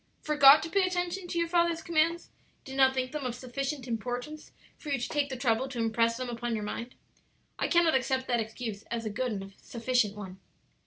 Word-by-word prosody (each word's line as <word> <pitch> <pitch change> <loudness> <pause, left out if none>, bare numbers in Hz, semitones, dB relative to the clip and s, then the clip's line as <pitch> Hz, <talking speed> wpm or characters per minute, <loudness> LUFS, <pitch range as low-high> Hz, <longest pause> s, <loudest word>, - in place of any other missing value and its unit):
forgot 295 -1 +7
to 330 - -4
pay 395 - +3
attention 355 0 -2
to 345 - -4
your 335 0 +1
father's 340 -1 +1
commands? 335 +1 +1 0.3
did 265 - -7
not 265 -1 +5
think 255 -1 -1
them 300 -2 -4
of 250 -2 -3
sufficient 260 +2 -4
importance 245 +6 -4 0.2
for 300 - -9
you 280 - +1
to 245 - -3
take 290 -2 0
the 260 - -4
trouble 245 +1 +1
to 260 - -7
impress 230 0 +1
them 255 0 -4
upon 240 -1 -3
your 215 - -3
mind. 235 +4 -5 0.6
I - - +1
cannot 340 -2 +4
accept 265 0 +1
that 240 -2 +1
excuse 220 -1 -5
as 230 -1 -3
a 215 - -2
good 250 +4 -2
and 195 -1 -6
sufficient 235 -3 0
one. 190 -2 -8
255 Hz, 210 wpm, -29 LUFS, 230-305 Hz, 0.6 s, forgot